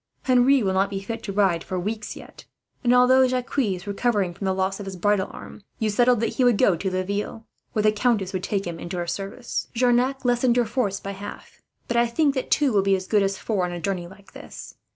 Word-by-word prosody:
Henri 255 Hz, 0 st, +4 dB
will 190 Hz, -1 st, +1 dB
not 195 Hz, +1 st, +2 dB
be 195 Hz, -1 st, -3 dB
fit 225 Hz, +4 st, -6 dB
to 200 Hz, -, -5 dB
ride 190 Hz, -4 st, +2 dB
for 185 Hz, -, -3 dB
weeks, 215 Hz, +3 st, -4 dB
yet; -, -, -13 dB, 0.4 s
and 240 Hz, -, +3 dB
although 255 Hz, +1 st, +6 dB
Jacques 255 Hz, +2 st, -2 dB
is 195 Hz, -7 st, -1 dB
recovering 205 Hz, -3 st, 0 dB
from 195 Hz, +3 st, -6 dB
the 190 Hz, 0 st, +1 dB
loss 190 Hz, +1 st, -1 dB
of 200 Hz, -, -7 dB
his 190 Hz, -, -5 dB
bridle 200 Hz, +1 st, +1 dB
arm, -, -, -11 dB, 0.2 s
you 220 Hz, -1 st, 0 dB
settled 240 Hz, +1 st, +3 dB
that 230 Hz, -, -2 dB
he 260 Hz, -, +3 dB
was 245 Hz, -1 st, +5 dB
to -, -, -2 dB
go 190 Hz, -, +4 dB
to 190 Hz, +4 st, -2 dB
Laville, 200 Hz, +4 st, -3 dB, 0.3 s
where 215 Hz, -, 0 dB
the 215 Hz, -, +5 dB
countess 210 Hz, -3 st, 0 dB
would 185 Hz, -, -2 dB
take 195 Hz, +1 st, -2 dB
him 170 Hz, -1 st, -5 dB
into 175 Hz, +2 st, -5 dB
her 175 Hz, -, -2 dB
service. 195 Hz, +7 st, -4 dB
Jarnac 250 Hz, +2 st, +2 dB
lessened 245 Hz, 0 st, +2 dB
your 240 Hz, -, +3 dB
force 215 Hz, -4 st, -1 dB
by 200 Hz, -, -6 dB
half; 200 Hz, +1 st, -10 dB, 0.3 s
but 235 Hz, -, -1 dB
I 235 Hz, 0 st, +4 dB
think 285 Hz, +4 st, +1 dB
that 260 Hz, -2 st, -3 dB
two 285 Hz, -5 st, +2 dB
will 200 Hz, -, +4 dB
be 195 Hz, 0 st, +3 dB
as 185 Hz, 0 st, -4 dB
good 210 Hz, +1 st, +2 dB
as 195 Hz, 0 st, 0 dB
four, 205 Hz, -5 st, -1 dB
on 180 Hz, -, -2 dB
a 175 Hz, -, -5 dB
journey 180 Hz, -1 st, -3 dB
like 195 Hz, +2 st, -17 dB
this. -, -, -10 dB
205 Hz, 250 wpm, -24 LUFS, 190-245 Hz, 0.4 s, although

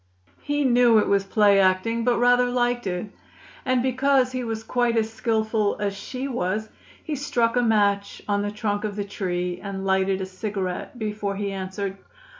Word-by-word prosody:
He 290 Hz, 0 st, -1 dB
knew 245 Hz, -2 st, +5 dB
it 210 Hz, -, +3 dB
was 200 Hz, -1 st, +2 dB
play 200 Hz, 0 st, +4 dB
acting, 195 Hz, +5 st, +2 dB
but 245 Hz, 0 st, +2 dB
rather 245 Hz, +1 st, +4 dB
liked 245 Hz, -2 st, 0 dB
it; 185 Hz, +3 st, -3 dB, 0.5 s
and, 255 Hz, -1 st, +2 dB
because 260 Hz, 0 st, +2 dB
he 255 Hz, -1 st, -3 dB
was 225 Hz, -1 st, -4 dB
quite 240 Hz, 0 st, +1 dB
as 225 Hz, 0 st, 0 dB
skillful 220 Hz, -2 st, 0 dB
as 200 Hz, -1 st, -1 dB
she 255 Hz, +6 st, -5 dB
was, 215 Hz, -3 st, -2 dB, 0.3 s
he 310 Hz, -, -4 dB
struck 240 Hz, -4 st, 0 dB
a 245 Hz, -, +3 dB
match 205 Hz, -3 st, +1 dB
on 205 Hz, -1 st, +1 dB
the 205 Hz, -, -1 dB
trunk 205 Hz, 0 st, -2 dB
of 210 Hz, -2 st, -3 dB
the 205 Hz, -1 st, -3 dB
tree 180 Hz, -3 st, -3 dB
and 195 Hz, -1 st, -5 dB
lighted 190 Hz, 0 st, +1 dB
a 190 Hz, -, -2 dB
cigarette 190 Hz, +2 st, -4 dB
before 210 Hz, -3 st, -3 dB
he 200 Hz, 0 st, -3 dB
answered. 195 Hz, 0 st, -4 dB
215 Hz, 180 wpm, -24 LUFS, 195-240 Hz, 0.5 s, knew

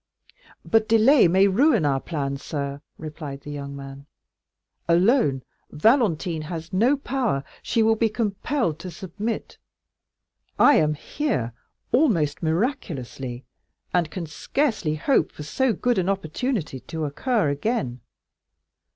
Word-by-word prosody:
"But 225 Hz, -1 st, +2 dB
delay 225 Hz, +1 st, +6 dB
may 190 Hz, +3 st, +4 dB
ruin 230 Hz, -, +3 dB
our 135 Hz, -2 st, +2 dB
plan, 140 Hz, -3 st, -3 dB
sir," 140 Hz, 0 st, -4 dB, 0.2 s
replied 150 Hz, -3 st, -7 dB
the 145 Hz, -, -8 dB
young 140 Hz, -1 st, -6 dB
man. 135 Hz, 0 st, -9 dB, 0.8 s
"Alone, 170 Hz, -, +3 dB, 0.3 s
Valentine 175 Hz, -, +2 dB
has 165 Hz, +1 st, -7 dB
no 240 Hz, +9 st, +3 dB
power; 245 Hz, -, -1 dB, 0.2 s
she 230 Hz, -, +1 dB
will 225 Hz, 0 st, +4 dB
be 225 Hz, 0 st, +2 dB
compelled 215 Hz, -, -1 dB
to 185 Hz, -, -6 dB
submit. 200 Hz, +6 st, -5 dB, 1.0 s
I 290 Hz, -, +6 dB
am 150 Hz, -1 st, +2 dB
here 145 Hz, -, -2 dB, 0.4 s
almost 190 Hz, -, +2 dB
miraculously, 155 Hz, -, -2 dB, 0.5 s
and 175 Hz, -3 st, +2 dB
can 175 Hz, +1 st, -5 dB
scarcely 180 Hz, -, -1 dB
hope 255 Hz, -, +2 dB
for 150 Hz, -, -9 dB
so 260 Hz, -, +1 dB
good 240 Hz, +2 st, +1 dB
an 185 Hz, +1 st, 0 dB
opportunity 195 Hz, -, -2 dB
to 160 Hz, +3 st, -5 dB
occur 205 Hz, -, 0 dB
again. 145 Hz, -, -2 dB
170 Hz, 125 wpm, -24 LUFS, 145-230 Hz, 1.0 s, delay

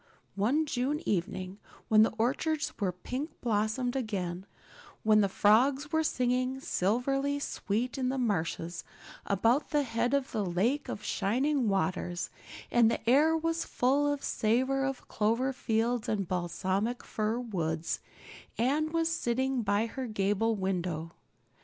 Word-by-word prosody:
One 250 Hz, +11 st, +2 dB
June 275 Hz, +2 st, -1 dB
evening, 185 Hz, +1 st, -2 dB, 0.3 s
when 215 Hz, -1 st, +6 dB
the 220 Hz, -, +4 dB
orchards 290 Hz, +7 st, 0 dB
were 195 Hz, -4 st, +1 dB
pink 255 Hz, -, -6 dB
blossomed 230 Hz, +3 st, 0 dB
again, 190 Hz, -7 st, -3 dB, 0.6 s
when 215 Hz, 0 st, +5 dB
the 200 Hz, -, +2 dB
frogs 265 Hz, +9 st, +3 dB
were 320 Hz, -, +2 dB
singing 255 Hz, -2 st, 0 dB
silverly 270 Hz, +6 st, 0 dB
sweet 250 Hz, -2 st, -2 dB
in 255 Hz, -1 st, +1 dB
the 265 Hz, -, -1 dB
marshes 170 Hz, -7 st, -1 dB, 0.4 s
about 230 Hz, +8 st, +2 dB
the 295 Hz, -1 st, +2 dB
head 240 Hz, +1 st, 0 dB
of 275 Hz, -1 st, -1 dB
the 215 Hz, -, -1 dB
Lake 205 Hz, +11 st, 0 dB
of 210 Hz, -, -5 dB
Shining 250 Hz, +5 st, +1 dB
Waters, 180 Hz, -3 st, -1 dB, 0.4 s
and 235 Hz, -2 st, +5 dB
the 230 Hz, -, -3 dB
air 305 Hz, +6 st, +5 dB
was 330 Hz, +1 st, -1 dB
full 280 Hz, +3 st, +1 dB
of 290 Hz, -1 st, -2 dB
the -, -, -5 dB
savor 260 Hz, +5 st, +1 dB
of 270 Hz, -1 st, -3 dB
clover 230 Hz, +5 st, +1 dB
fields 235 Hz, -1 st, 0 dB
and 200 Hz, -4 st, -1 dB
balsamic 185 Hz, +6 st, -1 dB
fir 215 Hz, +1 st, -1 dB
woods, 165 Hz, -9 st, -2 dB, 0.6 s
Anne 290 Hz, +6 st, +1 dB
was 330 Hz, 0 st, +1 dB
sitting 260 Hz, -4 st, 0 dB
by 205 Hz, 0 st, +1 dB
her 255 Hz, +2 st, -5 dB
gable 215 Hz, +1 st, +1 dB
window. 180 Hz, -4 st, -2 dB
230 Hz, 140 wpm, -30 LUFS, 200-270 Hz, 0.6 s, when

